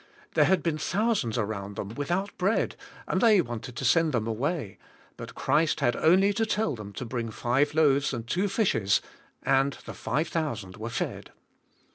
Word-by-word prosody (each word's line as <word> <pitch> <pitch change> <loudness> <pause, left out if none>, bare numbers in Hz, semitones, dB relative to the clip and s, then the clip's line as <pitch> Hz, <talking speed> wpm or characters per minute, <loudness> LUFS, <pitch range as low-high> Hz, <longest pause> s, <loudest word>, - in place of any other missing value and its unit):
There - - +5
had 190 -1 +2
been 160 -3 -1
thousands 200 - 0
around 100 -2 -3
them, 100 - -5
without 175 - -2
bread 195 +5 +1 0.3
and - - 0
they 220 -4 +6
wanted 120 -5 -4
to - - -4
send 165 -3 +3
them 115 -3 0
away, 120 - -2 0.4
but - - -9
Christ 160 +1 +1
had 120 - +2
only 190 +5 +4
to 225 +2 +1
tell 220 0 0
them 105 -4 -8
to 125 - -5
bring 115 -1 -3
five 130 +7 0
loaves 145 -3 +3
and 120 -3 -4
two 185 +11 0
fishes 180 - +1 0.4
and 135 +1 +2
the - - -7
five 155 +5 -2
thousand 120 - -3
were 110 +2 -5
fed. - - -4
140 Hz, 175 wpm, -27 LUFS, 115-175 Hz, 0.4 s, they